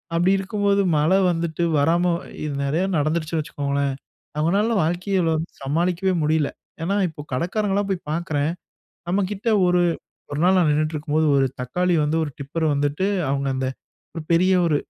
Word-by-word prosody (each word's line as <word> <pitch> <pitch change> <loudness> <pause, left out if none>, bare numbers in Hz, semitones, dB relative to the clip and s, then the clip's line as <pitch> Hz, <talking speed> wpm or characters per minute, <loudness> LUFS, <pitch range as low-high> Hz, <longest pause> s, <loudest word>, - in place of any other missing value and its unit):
அப்டி 175 +3 +3
இருக்கும்போது 200 0 +1 0.2
மழை 160 +6 +3
வந்துட்டு 170 0 -2 0.2
வராம 170 +4 +2 0.3
இது 150 -2 -3
நெறைய 160 +7 0
நடந்துருச்சுன்னு 155 +1 0
வச்சுக்கோங்களேன். 140 -1 -2 0.5
அவங்களால 200 +9 +2
வாழ்க்கையில 175 +1 0
வந்து 160 +2 -4
சமாளிக்கவே 175 +6 0
முடியல. 155 -1 +2 0.3
ஏன்னா 195 +4 0
இப்போ 150 -2 -9
கடைக்காரங்கலாம் 200 +7 0
போய் 180 -5 -3
பார்க்குறேன். 155 -3 -1 0.6
நம்மகிட்ட 200 +4 -1 0.2
ஒரு 180 0 +3 0.5
ஒரு 145 - -3
நாள் 185 +1 +5
நான் 165 -4 +3
நின்னுக்கிட்டிருக்கும்போது, 155 +1 0
ஒரு 135 -1 +3
தக்காளி 180 +8 0
வந்து 155 +2 0
ஒரு 145 - -5
டிப்பர் 145 +4 -3
வந்துட்டு 145 +6 0 0.2
அவங்க 140 0 -1
அந்த 130 0 -1 0.5
ஒரு 165 - -5
பெரிய 185 +3 +4
ஒரு 150 -3 +2
165 Hz, 145 wpm, -22 LUFS, 150-185 Hz, 0.6 s, நாள்